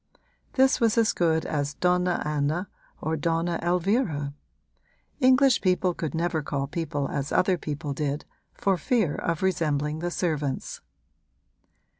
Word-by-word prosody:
This 265 -1 +4
was 230 -1 +3
as 225 -2 +4
good 160 -2 +1
as 145 -1 -2
Donna 180 0 +1
Anna 150 +5 -1 0.3
or 160 +1 -1
Donna 165 +2 0
Elvira: 175 - 0 0.9
English 260 -1 +5
people 185 -1 +2
could 160 -3 -4
never 165 -1 0
call 140 -1 -2
people 145 -2 -3
as 140 0 -3
other 185 0 +3
people 150 -3 -4
did, 145 0 -2 0.3
for 195 -2 +1
fear 210 - +1
of 165 +1 -2
resembling 155 -4 0
the 175 +1 -2
servants. 150 -6 -2
165 Hz, 130 wpm, -26 LUFS, 150-185 Hz, 0.9 s, English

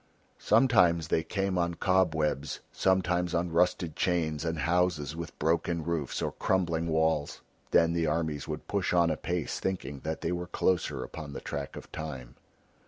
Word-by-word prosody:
Sometimes 90 - +4
they - - +2
came 95 +2 -1
on 85 0 0
cobwebs, 80 -7 +1
sometimes 90 -2 +1
on 85 0 0
rusted 85 -1 +1
chains 80 -4 0
and 80 -1 -1
houses 80 -1 +1
with 85 -1 -7
broken 85 +1 0
roofs 80 -4 -2
or - - -1
crumbling 85 -3 0
walls. 80 -2 +1 0.3
Then 85 0 +4
the 85 -1 +1
armies 80 -4 -1
would 75 0 -5
push 100 -3 0
on 85 -2 +4
apace 85 +1 -2
thinking 75 -8 -3
that 80 +3 -4
they 80 - -1
were 90 0 -3
closer 85 -7 0
upon 75 -3 -8
the - - -5
track 70 -1 -5
of - - -10
Time. 65 -6 -6
85 Hz, 160 wpm, -29 LUFS, 80-90 Hz, 0.3 s, Sometimes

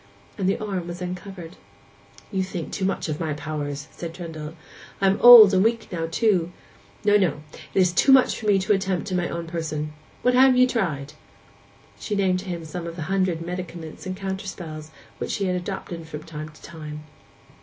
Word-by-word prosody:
And 190 -1 0
the - - +1
arm 195 -6 -4
was 175 0 -6
uncovered. 180 -1 -7 0.7
'You 190 -2 0
think 185 -3 -5
too 195 - -2
much 195 - -1
of 155 -1 -3
my 160 -3 -1
powers!' 150 -1 -5
said 165 -1 -7
Trendle; 165 -4 -7
'and 160 - -10 0.4
I 195 - +1
am 195 +1 +3
old 235 -5 +11
and 190 0 +4
weak 230 0 0
now, 165 -2 -2
too. 180 -2 +1 0.5
No, 205 0 +6
no; 160 -7 0 0.3
it - - +4
is 180 -1 +4
too 270 - +4
much 265 -1 +5
for 215 - -5
me 205 -2 +5
to 190 +2 +2
attempt 195 -1 -1
in 185 - +1
my 175 - -1
own 170 0 -4
person. 155 -2 -4 0.3
What 250 - +4
have 255 0 +6
ye 255 - +7
tried?' 155 - -2 0.9
She 210 - -3
named 190 -2 +2
to 190 - -9
him 170 -3 -5
some 170 +2 -6
of 165 - -6
the 170 - -5
hundred 185 -4 0
medicaments 175 -2 -7
and 185 0 -4
counterspells 190 -5 -6 0.3
which - - -3
she 200 - -1
had 180 -1 0
adopted 175 -2 -5
from 150 -1 -7
time 155 -2 -7
to 155 - -18
time. 150 -2 -8
180 Hz, 200 wpm, -24 LUFS, 160-195 Hz, 0.9 s, old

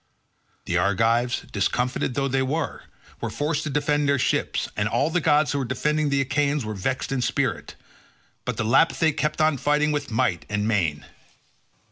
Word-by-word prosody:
The - - 0
Argives, 115 +4 +1
discomfited 125 +5 -1
though 135 +1 0
they 135 0 0
were, 150 +5 -2 0.4
were 115 - -2
forced 145 +8 -1
to - - -2
defend 145 0 +1
their 140 - +3
ships, - - 0
and 105 0 0
all 140 +8 +1
the 180 - +1
gods 150 -1 +3
who 145 - -1
were - - -1
defending 150 +5 0
the 140 -1 +2
Achaeans 140 0 0
were 110 - -4
vexed 130 +8 -2
in 135 -2 0
spirit; - - -1 0.7
but - - -3
the - - -1
Lapithae 160 +6 +3
kept 150 0 -1
on 155 -2 +3
fighting 150 +3 +1
with 145 -1 -2
might 110 -5 0
and 105 0 -1
main. 85 -10 0
135 Hz, 175 wpm, -24 LUFS, 115-150 Hz, 0.7 s, their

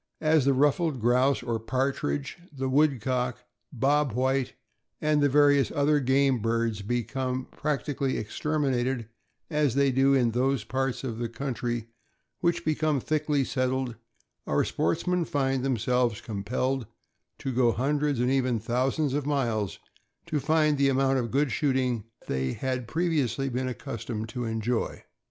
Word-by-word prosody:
As 155 -3 +3
the 140 - +4
ruffed 145 +1 +2
grouse, 125 +4 +2
or 115 -2 -1
partridge, 120 - -2
the 135 -2 -3
woodcock. 130 -3 +1
' - - -53
' - - -54
Bob 140 +1 +1
White," 130 +1 0 0.5
and 150 -1 +2
the 145 - +4
various 145 -3 +4
other 145 +1 +2
game 135 -1 +2
birds 115 -1 0
become 125 +4 -2
practi 145 -1 -2
cally 135 -1 0
exterminated, 130 -1 -1 0.4
as 150 -5 +1
they 140 -1 +3
do 135 +2 +4
in 120 -3 +3
those 130 0 +1
parts 135 +3 -2
of 115 -4 -4
the 120 -1 -2
coun 130 +3 -4
try 120 -1 -3 0.5
which 170 0 0
become 155 -2 +1
thickly 150 0 0
settled, 130 -2 -1 0.5
our - - +2
sportsmen 180 - 0
find 135 -4 0
themselves 125 -2 +1
compelled 115 +4 -2 0.5
to 135 - -4
go 120 -1 +3
hundreds, 145 +2 0
and 125 +1 +2
even 130 -3 +1
thousands, 130 +6 0
of 145 0 -1
miles 115 -9 0 0.5
to 150 - -1
find 155 -1 +2
the 140 0 +4
amount 135 0 +2
of 120 -2 -2
good 140 +3 +1
shooting 130 -6 0 0.2
they 65 -1 -1
had 130 -3 -3
pre 165 +8 0
viously 135 -4 0
been 130 +1 -1
accustomed 115 -4 -5
to 125 0 -4
enjoy. 115 +1 -2
130 Hz, 150 wpm, -27 LUFS, 120-140 Hz, 0.5 s, the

